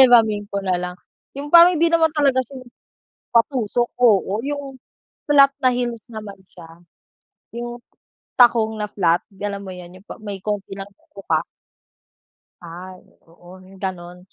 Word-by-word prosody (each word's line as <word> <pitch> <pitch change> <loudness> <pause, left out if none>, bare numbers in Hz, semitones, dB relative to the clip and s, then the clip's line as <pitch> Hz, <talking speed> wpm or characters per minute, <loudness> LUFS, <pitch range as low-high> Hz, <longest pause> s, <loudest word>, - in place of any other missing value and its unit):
Hihiramin 220 -5 +5
ko 200 -1 -4
na 180 -2 0
lang. 180 0 -5 0.4
Yung 290 +1 -7
parang 345 +1 +8
hindi 335 +1 +2
naman 325 -1 +4
talaga 275 -3 +3
siya 260 +2 -8
yung 245 - -19 0.6
patusok, 240 -1 +1
oo. 220 -2 +2
Yung 285 -2 -5 0.5
flat 275 -1 +6
na 255 - +4
heels 245 -2 -2
naman 215 -4 -9
siya, 165 -1 -15 0.7
yung 240 0 -6 0.6
takong 230 -3 +5
na 210 - -2
flat, 175 -5 +1 0.2
alam 200 0 -4
mo 185 - -7
'yon, 180 +1 -12
yung - - -29
pa - - -8
may 200 -2 -6
konti 205 -1 -4
lang 195 - -6
na 200 - -33
tuka. 165 -5 -1 1.2
Ay, 180 +2 -10 0.3
oo, 175 +2 -16
'yong 185 +1 -17
gano'n 180 -2 -5
210 Hz, 155 wpm, -21 LUFS, 185-250 Hz, 1.2 s, parang